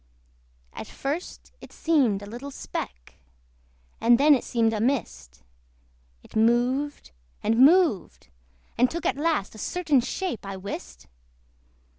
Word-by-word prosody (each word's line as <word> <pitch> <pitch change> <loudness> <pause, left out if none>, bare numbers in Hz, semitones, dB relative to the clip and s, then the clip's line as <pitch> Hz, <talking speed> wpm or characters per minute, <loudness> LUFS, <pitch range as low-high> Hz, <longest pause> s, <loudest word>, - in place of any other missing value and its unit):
At - - -8
first 295 +6 -5
it - - -12
seemed 255 -12 +1
a - - -7
little 240 +7 -8
speck, 60 - -7 0.8
And 235 +1 +5
then 295 +3 +6
it 265 - +1
seemed 225 -2 +1
a 215 - -2
mist: 70 - -2 0.8
It - - -17
moved 245 - +1 0.3
and 225 +1 +1
moved, 310 - +3 0.5
and 250 +1 +5
took 340 - -5
at - - +1
last 305 -9 0
A 220 - -12
certain 315 - +1
shape, 355 - -4
I 195 -1 -6
wist. 185 - -8
240 Hz, 130 wpm, -25 LUFS, 210-290 Hz, 0.8 s, then